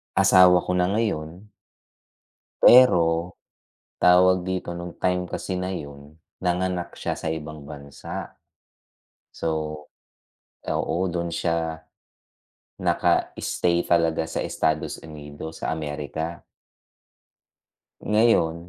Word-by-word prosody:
asawa 90 -1 +6
ko - - -3
na 90 0 +2
ngayon. 100 -2 -3 1.1
Pero 85 -8 +5 0.6
tawag 90 0 +4
dito, 95 -2 -3
nung 85 0 -7
time 90 0 +1
kasi 90 +1 -4
na 90 +1 -3
'yun, 70 -1 -9 0.2
nanganak 90 0 -1
siya - - -4
sa 80 - -3
ibang 75 -2 -8
bansa. 70 -1 -8 0.9
So, 80 - -3 1.2
oo 80 - -1
dun 85 -1 -3
siya 80 -1 -2 1.0
naka - - +1
stay 85 -1 0
talaga 80 -1 +2
sa 80 - -4
Estados 80 -1 -1
Unidos 75 +1 -9
sa - - -3
Amerika. 80 +2 -5 1.7
Ngayon, 105 -7 +3
85 Hz, 95 wpm, -24 LUFS, 80-90 Hz, 1.7 s, asawa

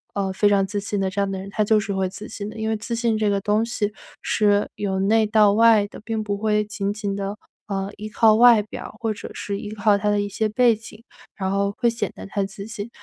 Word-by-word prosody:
呃， 195 -2 -1
非 205 +2 +3
常 195 -1 +2
自 205 +1 -3
信 205 0 -2
的 190 - 0
这 200 +2 -2
样 200 -1 -1
的 190 - -4
人， 195 +1 -8
他 215 - +1
就 215 +1 +3
是 205 -1 -3
会 190 -1 0
自 210 +3 -8
信 205 0 -6
的， 220 - -10
因 220 0 -2
为 220 - +1
自 225 +2 -5
信 230 -1 +1
这 215 -1 +1
个 200 -1 +1
东 210 +3 +1
西 215 -3 -2 0.3
是 205 -1 +2
由 190 -2 -2
内 220 +3 +3
到 210 -1 +4
外 220 -1 +5
的， - - -12
并 220 -1 -2
不 205 -1 -2
会 210 0 +1
仅 205 -1 -3
仅 205 -2 -3
地， 200 +1 -4 0.3
呃， 195 -1 -2
依 210 +1 -6
靠 215 +1 +4
外 235 -1 +7
表 215 - -9
或 225 -2 -1
者 205 - -9
是 200 -1 -4
依 210 0 -7
靠 210 -1 +3
他 210 +1 0
的 205 0 +2
一 205 - -1
些 215 +2 -1
背 235 +1 +4
景， 215 0 -12 0.3
然 190 -1 -2
后 200 0 0
会 240 - +2
显 230 -3 -3
得 - - -10
他 200 0 -1
自 195 +1 -7
信。 225 -1 -6
210 Hz, 280 characters per minute, -23 LUFS, 200-220 Hz, 0.3 s, 外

